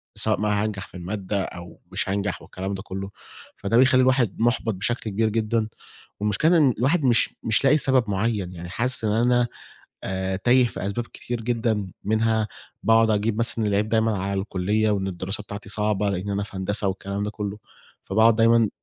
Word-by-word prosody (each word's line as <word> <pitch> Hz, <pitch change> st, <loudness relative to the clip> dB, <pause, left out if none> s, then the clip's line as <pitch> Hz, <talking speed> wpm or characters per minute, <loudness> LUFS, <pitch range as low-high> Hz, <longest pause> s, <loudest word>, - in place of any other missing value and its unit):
سواء -, -, +2 dB
بقى 105 Hz, -1 st, +1 dB
هانجح 105 Hz, -1 st, -2 dB
في -, -, -11 dB
المادة 95 Hz, +2 st, -3 dB
أو 85 Hz, 0 st, -9 dB
مش -, -, -2 dB
هانجح 100 Hz, +1 st, -2 dB
والكلام 95 Hz, +2 st, -5 dB
ده 95 Hz, -, -5 dB
كله، 95 Hz, 0 st, -6 dB, 0.5 s
فده 105 Hz, +3 st, +1 dB
بيخلّي 130 Hz, 0 st, +5 dB
الواحد 125 Hz, -5 st, +2 dB
مُحبَط 115 Hz, -2 st, +1 dB
بشكل 110 Hz, +4 st, -2 dB
كبير 110 Hz, +2 st, +1 dB
جدًا، 110 Hz, 0 st, 0 dB, 0.5 s
والمشكلة 105 Hz, -, +2 dB
إن 140 Hz, -6 st, +4 dB
الواحد 140 Hz, +5 st, +2 dB
مش 120 Hz, -2 st, +3 dB
مش 115 Hz, +4 st, +1 dB
لاقي 135 Hz, +3 st, +6 dB
سبب 130 Hz, -7 st, +2 dB
معين 100 Hz, -2 st, -1 dB
يعني 85 Hz, 0 st, -8 dB
حاسس 125 Hz, +3 st, -1 dB
إن 105 Hz, -, +1 dB
أنا 120 Hz, +2 st, +3 dB, 0.6 s
آآ 95 Hz, 0 st, -2 dB
تايه 125 Hz, +4 st, +4 dB
في 100 Hz, -, -5 dB
أسباب 120 Hz, +4 st, -3 dB
كتير 120 Hz, -1 st, -5 dB
جدًا، 110 Hz, -5 st, -1 dB
منها 110 Hz, 0 st, +1 dB, 0.3 s
باقعد 115 Hz, 0 st, +4 dB
أجيب 105 Hz, +1 st, 0 dB
مثلًا 115 Hz, -1 st, +1 dB
العيب 105 Hz, +1 st, +1 dB
دايمًا 110 Hz, -3 st, +1 dB
على 100 Hz, 0 st, -1 dB
الكلية 105 Hz, +2 st, 0 dB
وإن 95 Hz, -2 st, 0 dB
الدراسة 95 Hz, +3 st, -4 dB
بتاعتي 100 Hz, 0 st, -8 dB
صعبة 105 Hz, -1 st, 0 dB
لإن 95 Hz, +2 st, -3 dB
أنا 100 Hz, 0 st, -1 dB
في 100 Hz, -1 st, -7 dB
هندسة 100 Hz, +2 st, 0 dB
والكلام 100 Hz, +1 st, -3 dB
ده 105 Hz, -, -3 dB
كله، 105 Hz, -1 st, -5 dB, 0.5 s
فباقعد 110 Hz, +3 st, +4 dB
دايمًا 115 Hz, -1 st, +4 dB
105 Hz, 180 wpm, -24 LUFS, 100-115 Hz, 0.6 s, لاقي